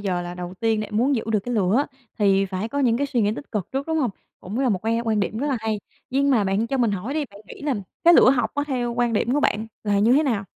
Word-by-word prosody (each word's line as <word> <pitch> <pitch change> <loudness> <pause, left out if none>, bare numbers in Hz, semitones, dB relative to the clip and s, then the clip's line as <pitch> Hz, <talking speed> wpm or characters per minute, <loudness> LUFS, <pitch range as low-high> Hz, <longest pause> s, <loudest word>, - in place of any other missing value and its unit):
giờ 185 -3 -1
là 175 0 -6
đầu 180 0 -6
tiên 225 -1 +1
để 215 - -3
muốn 245 +7 +2
giữ 225 - -1
được 210 - +2
cái 245 +4 -4
lửa 215 +7 +2 0.3
thì 195 -2 +3
phải 190 +3 -3
có 285 - -3
những 240 -4 +3
cái 285 +2 0
suy 250 -4 0
nghĩ 205 0 +2
tích 280 - -10
cực 205 -5 -2
trước, 270 +1 -2
đúng 320 0 0
hông? 255 -7 +1 0.3
Cũng 205 +7 -5
là 270 - +2
một 200 -5 +1
cái 230 +1 +1
quan 220 -2 +1
điểm 210 +3 -2
rất 285 - -1
là 275 -3 0
hay. 220 -2 -2 0.3
Nhưng 280 +2 +2
mà 225 -6 +3
bạn 195 +4 0
cho 270 - -1
mình 235 -3 +2
hỏi 205 +8 -3
đi, 305 -2 0
bạn 200 - -14
nghĩ - - -11
là 290 -3 0 0.3
cái 345 +1 +8
lửa 255 - +7
học 245 -5 +1
á, 290 - 0
theo 245 -4 -1
quan 240 -1 +1
điểm 230 +3 +1
của 295 - +2
bạn 220 -5 +1 0.2
là 205 -1 +2
như 225 +4 +4
thế 290 - +5
nào? 225 -9 0
225 Hz, 305 wpm, -23 LUFS, 205-265 Hz, 0.3 s, cái